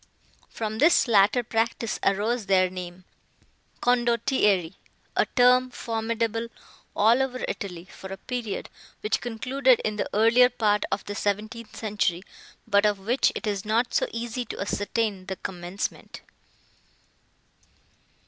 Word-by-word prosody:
From 220 -1 -4
this 310 0 +5
latter 220 +2 +4
practice 225 0 -1
arose 210 +3 0
their 185 -2 +3
name—Condottieri; 205 +3 -1 0.4
a - - +2
term 250 0 +4
formidable 230 -1 -2 0.5
all 225 +5 +4
over 255 -1 -2
Italy, 180 -5 -5
for 190 0 -11
a 195 - -5
period, 240 -4 -4 0.3
which 210 - 0
concluded 255 +2 +2
in 215 -1 -1
the - - -2
earlier 230 +4 +5
part 210 -4 +1
of 195 +1 -2
the 205 - -5
seventeenth 215 +3 -3
century, 205 -5 -1 0.4
but 200 -2 +3
of 210 -1 +2
which 230 +7 +1
it - - -4
is 200 -2 -2
not 225 +3 0
so - - +2
easy 235 +1 -4
to - - -7
ascertain 205 -1 -2
the 190 - -3
commencement. 180 +1 -6
220 Hz, 125 wpm, -26 LUFS, 200-240 Hz, 0.5 s, this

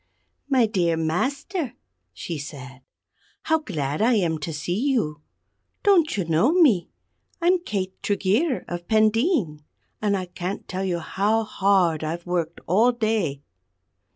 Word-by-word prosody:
"My 260 -4 +4
dear 175 -6 +1
Master," 265 - -2 0.4
she 165 -3 -6
said, 135 -3 -9 0.6
"how 320 0 +2
glad 150 - -3
I 235 +2 +4
am 165 -6 +1
to 165 - -4
see 160 +3 -3
you. 160 - 0 0.6
Don't 355 - +4
you 190 - 0
know 165 - +3
me? 265 - +4 0.5
I'm 355 +2 +3
Kate 195 - -4
Tregeer 210 - 0
of 175 0 -6
Pendeen; 220 - +2 0.4
and 205 -2 +1
I 185 - -3
can't 180 +2 -5
tell 185 +1 -3
you 180 -2 0
how 205 +6 0
hard 190 -6 +2
I've 165 +2 -4
worked 170 -2 -2
all 220 +8 +4
day." 215 - -1
190 Hz, 135 wpm, -24 LUFS, 165-235 Hz, 0.6 s, My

